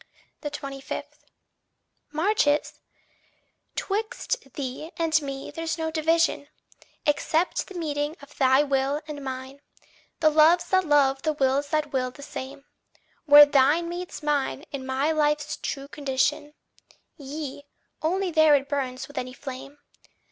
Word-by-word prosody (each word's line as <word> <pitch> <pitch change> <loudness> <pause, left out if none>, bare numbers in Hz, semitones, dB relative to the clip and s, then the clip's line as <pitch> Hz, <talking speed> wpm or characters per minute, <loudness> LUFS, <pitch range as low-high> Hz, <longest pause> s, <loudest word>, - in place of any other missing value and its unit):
25. 275 -2 -5 1.1
Marches? 310 -2 +1 1.0
'Twixt 430 - -3
thee 275 +3 -5
and 320 -2 +2
me 275 -1 -6
there's 330 -1 -3
no 320 -1 -2
division, 320 -2 +1 0.6
Except 315 +3 +1
the 390 - -11
meeting 295 -1 -2
of 285 +1 -15
thy 265 +1 +5
will 280 +1 0
and 290 -2 -7
mine, 265 +1 -6 0.6
The 310 -2 +4
loves 325 +3 +5
that 375 -1 +3
love, 275 -2 +3
the 310 +1 0
wills 280 0 +1
that 300 -1 -1
will 255 -1 0
the 285 +3 -12
same. 275 0 -8 0.6
Where 295 -1 +10
thine 290 +4 +3
meets 350 -2 -6
mine 295 0 -1
is 280 -2 -4
my 265 +4 0
life's 300 -1 0
true 275 0 -5
condition; 290 +1 -1 0.6
Yea, 285 -1 -7 0.3
only 365 +3 0
there 315 -2 +6
it 275 -1 0
burns 265 -2 -3
with 285 - -5
any 255 0 -6
flame. 270 +1 -8
290 Hz, 130 wpm, -26 LUFS, 275-315 Hz, 1.1 s, Where